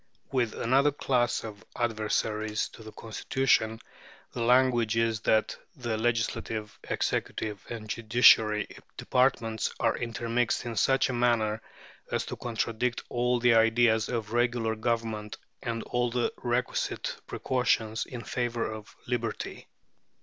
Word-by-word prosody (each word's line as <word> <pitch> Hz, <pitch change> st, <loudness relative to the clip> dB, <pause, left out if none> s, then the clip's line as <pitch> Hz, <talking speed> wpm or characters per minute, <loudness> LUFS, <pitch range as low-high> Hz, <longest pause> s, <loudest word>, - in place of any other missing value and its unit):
With 120 Hz, -4 st, 0 dB
another 135 Hz, +5 st, +3 dB
class 120 Hz, -4 st, 0 dB
of 110 Hz, -1 st, -8 dB
adversaries 110 Hz, -1 st, -1 dB
to -, -, -14 dB
the 110 Hz, 0 st, -10 dB
Constitution, 110 Hz, 0 st, 0 dB, 0.5 s
the 120 Hz, -, -5 dB
language 120 Hz, -2 st, +3 dB
is, 115 Hz, -1 st, +1 dB
that 110 Hz, 0 st, +2 dB, 0.2 s
the 120 Hz, -4 st, -2 dB
legislative, 110 Hz, -1 st, -2 dB
executive, 105 Hz, -2 st, -2 dB
and 115 Hz, -2 st, -6 dB
judiciary 110 Hz, -1 st, +5 dB, 0.3 s
departments 115 Hz, -4 st, +1 dB
are -, -, +2 dB
intermixed 115 Hz, +1 st, -1 dB
in 120 Hz, -1 st, -4 dB
such 135 Hz, +5 st, +3 dB
a -, -, -1 dB
manner 115 Hz, -3 st, +1 dB, 0.5 s
as -, -, 0 dB
to -, -, -5 dB
contradict 115 Hz, 0 st, -2 dB
all 125 Hz, 0 st, +1 dB
the 120 Hz, 0 st, +5 dB
ideas 115 Hz, 0 st, +4 dB
of 115 Hz, -2 st, -3 dB
regular 120 Hz, -2 st, +1 dB
government 110 Hz, -2 st, -2 dB, 0.2 s
and 115 Hz, -2 st, -3 dB
all 120 Hz, 0 st, 0 dB
the 120 Hz, 0 st, 0 dB
requisite 125 Hz, 0 st, -1 dB
precautions 115 Hz, -4 st, 0 dB
in 120 Hz, -2 st, -7 dB
favour 120 Hz, 0 st, -2 dB
of 110 Hz, -1 st, -10 dB
liberty. 120 Hz, -2 st, -3 dB
115 Hz, 125 wpm, -28 LUFS, 110-120 Hz, 0.5 s, judiciary